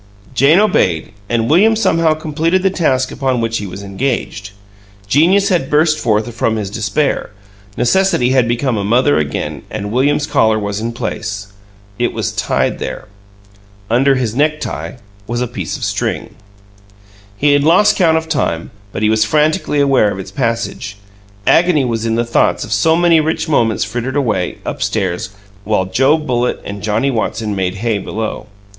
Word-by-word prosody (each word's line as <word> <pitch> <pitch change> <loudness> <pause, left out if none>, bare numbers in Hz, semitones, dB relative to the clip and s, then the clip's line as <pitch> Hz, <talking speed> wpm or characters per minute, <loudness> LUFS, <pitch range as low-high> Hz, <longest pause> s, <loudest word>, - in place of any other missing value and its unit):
Jane 140 +7 +4
obeyed, 95 - +1 0.2
and 115 -1 0
William 210 - +4
somehow 165 -7 +2
completed 160 +4 -1
the 195 - +2
task 130 -8 0
upon 130 -2 -1
which 115 0 -1
he 100 - -5
was 95 +2 -8
engaged. 100 -1 -3 0.6
Genius 175 - +3
had 170 -8 0
burst 155 +1 +3
forth 110 +1 0
from 115 0 0
his 105 -3 -4
despair; 115 +7 -1 0.5
necessity 130 -1 +2
had 130 -3 +3
become 120 0 0
a 100 - -1
mother 125 - +3
again, 75 -2 -3
and 105 0 -5
William's 145 +4 +1
collar 110 -7 +2
was 100 -1 -3
in 115 +2 -3
place. 105 -3 -5 0.5
It 120 - 0
was - - -2
tied - - -1
there. - - -6 0.8
Under 135 +3 +4
his 120 -4 -1
necktie 155 +2 -1 0.3
was 120 +1 -2
a 125 - 0
piece 95 -9 -5
of - - -8
string. - - -2 1.0
He 145 +3 +3
had 145 0 +3
lost 170 +7 +4
count 165 -4 +3
of 160 0 -3
time, 105 - -2 0.2
but 105 - -4
he 105 - +3
was 110 -1 +3
frantically 150 - +1
aware 135 -6 +3
of - - -5
its 95 - -8
passage; 115 -5 -3 0.5
agony 165 -5 +4
was 115 -2 -2
in 115 - 0
the 120 +1 0
thought 115 - +1
of - - -4
so 160 0 +3
many 170 -1 +4
rich 160 +2 -1
moments 115 -8 +1
frittered 120 +6 -4
away; 115 -10 -1
up - - -5
stairs, 95 -3 -1 0.3
while 105 -3 0
Joe 135 +11 +3
Bullitt 125 -5 -1
and 100 0 -6
Johnnie 110 +6 0
Watson 110 -2 -2
made 95 -1 -1
hay 110 0 -1
below. 110 +2 -5
120 Hz, 170 wpm, -16 LUFS, 105-150 Hz, 1.0 s, Jane